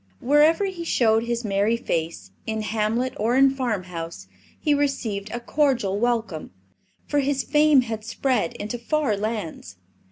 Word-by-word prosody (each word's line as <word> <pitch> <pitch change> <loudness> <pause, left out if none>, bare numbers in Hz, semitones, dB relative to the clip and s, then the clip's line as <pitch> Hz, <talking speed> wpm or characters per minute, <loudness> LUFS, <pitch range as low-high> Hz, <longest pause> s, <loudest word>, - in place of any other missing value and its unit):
Wherever 300 +8 +4
he 370 -3 -4
showed 225 -7 +2
his 235 0 -2
merry 205 +3 +1
face, 165 -6 -3 0.2
in 220 -1 -2
hamlet 225 +4 -1
or 225 +4 +1
in 270 0 +6
farmhouse, 180 - -4 0.3
he 300 - +2
received 235 -8 -1
a 240 - -4
cordial 240 -6 +1
welcome, 225 -8 -1 0.6
for 290 - 0
his 275 0 0
fame 295 -2 +4
had 225 -3 -5
spread 230 -4 -1
into 215 +4 -5
far 280 -2 0
lands. 200 - -4
235 Hz, 140 wpm, -24 LUFS, 210-275 Hz, 0.6 s, in